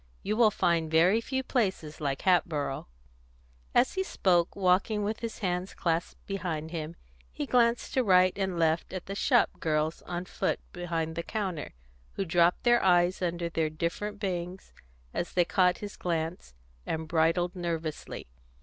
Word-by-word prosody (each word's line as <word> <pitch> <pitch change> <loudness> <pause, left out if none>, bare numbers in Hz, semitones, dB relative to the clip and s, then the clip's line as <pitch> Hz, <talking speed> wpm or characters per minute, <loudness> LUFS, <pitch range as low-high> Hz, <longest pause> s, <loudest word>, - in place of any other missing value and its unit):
You 210 - -1
will 225 -1 +6
find 170 -5 +1
very 175 +8 +4
few 265 +2 -2
places 190 - -1
like 140 -2 -2
Hatboro'." 155 - +1 0.9
As 245 +2 +4
he 380 - 0
spoke, 175 - +1
walking 200 +3 +2
with 215 +2 -2
his 230 -2 -5
hands 180 +1 -2
clasped 165 0 -2
behind 165 -5 -3
him, 165 -1 -5 0.4
he 65 - -4
glanced 235 - +2
to 260 - +2
right 185 -3 +5
and 190 -3 -2
left 165 +1 +1
at 185 -2 -5
the 195 - -5
shop 240 +4 +3
girls 155 0 0
on 175 0 -3
foot - - -1
behind 165 -2 -3
the 170 - -1
counter, 185 - -4 0.4
who 195 - -2
dropped 175 +1 +3
their 240 -1 +4
eyes 180 0 +3
under 170 -1 -1
their 165 -1 0
different 170 +7 -3
bangs 180 -1 -4 0.4
as 175 - -3
they 175 -1 +3
caught 180 -1 +3
his 205 - -9
glance, 165 - -3 0.3
and 160 - -3
bridled 165 +3 +1
nervously. 165 -3 -4
175 Hz, 160 wpm, -29 LUFS, 165-195 Hz, 0.9 s, will